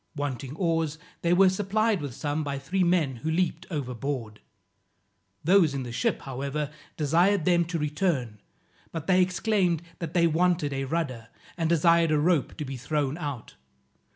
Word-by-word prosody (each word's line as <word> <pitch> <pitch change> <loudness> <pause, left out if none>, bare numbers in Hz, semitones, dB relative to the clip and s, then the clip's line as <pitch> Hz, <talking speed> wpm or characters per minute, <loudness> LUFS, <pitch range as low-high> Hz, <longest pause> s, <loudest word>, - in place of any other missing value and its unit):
Wanting 140 -1 -4
oars, 165 -3 0 0.2
they 170 - +1
were 190 +2 +6
supplied 205 +1 +1
with 140 -5 -5
some 150 +1 -2
by 140 -1 -3
three 180 +8 0
men 170 -7 +2
who 155 +7 -4
leaped 170 +1 0
overboard. 125 - -4 1.0
Those 170 -4 +4
in 135 - -2
the 120 - -6
ship, 115 - 0
however, 140 +2 -3 0.3
desired 170 +4 +3
them 175 -1 +3
to 170 0 -3
return, 150 - -1 0.5
but 165 -2 -5
they 185 0 +4
exclaimed, 180 -2 +1 0.2
that 165 0 -5
they 170 -1 +5
wanted 165 -2 +2
a 135 0 -2
rudder, 130 -7 -3 0.3
and 165 -2 -1
desired 170 0 +4
a 155 - +3
rope 160 -1 +1
to 150 - -4
be 135 -1 -5
thrown 145 +1 -1
out. 145 -7 -5
155 Hz, 160 wpm, -27 LUFS, 140-175 Hz, 1.0 s, were